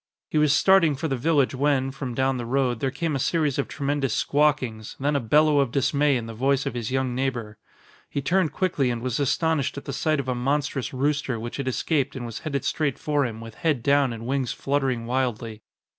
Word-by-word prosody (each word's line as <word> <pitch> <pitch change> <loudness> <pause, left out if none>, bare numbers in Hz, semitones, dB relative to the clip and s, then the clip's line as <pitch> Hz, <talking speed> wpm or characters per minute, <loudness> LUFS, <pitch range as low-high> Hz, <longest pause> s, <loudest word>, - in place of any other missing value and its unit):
He 155 - +2
was 150 -1 +4
starting 170 -1 +5
for 160 +4 -3
the 135 - -1
village 140 +1 +2
when, 135 0 +1
from 135 -3 -5
down 130 0 +1
the 120 - -4
road, 125 -2 +1
there 135 - 0
came 150 +3 -2
a - - -1
series 150 -1 0
of 140 - 0
tremendous 140 -4 -1
squawkings, 140 -7 0
then 145 +2 0
a - - +3
bellow 150 +5 +4
of 135 -3 +2
dismay 140 +1 +2
in 115 - -4
the 115 - -7
voice 135 +4 +1
of - - -2
his 120 -3 -3
young 130 -1 0
neighbor. 120 -5 -3 0.5
He - - -2
turned 165 +3 +1
quickly 155 -6 0
and 120 -1 -3
was 130 0 -1
astonished 145 0 0
at 140 - -7
the 140 - -4
sight 155 +2 0
of 135 - -3
a 130 - +1
monstrous 135 +1 -1
rooster 140 -2 -1
which 120 +1 -6
had 140 -2 -4
escaped 140 +1 0
and 125 -2 -5
was 115 -2 -6
headed 140 -5 -3
straight 145 -4 0
for 145 -3 0
him 110 -1 -7
with 115 -1 -9
head 150 -4 -1
down 140 -1 +3
and 115 0 -7
wings 130 -1 -1
fluttering 135 -4 -1
wildly. 120 -3 -2
135 Hz, 220 wpm, -25 LUFS, 125-145 Hz, 0.5 s, starting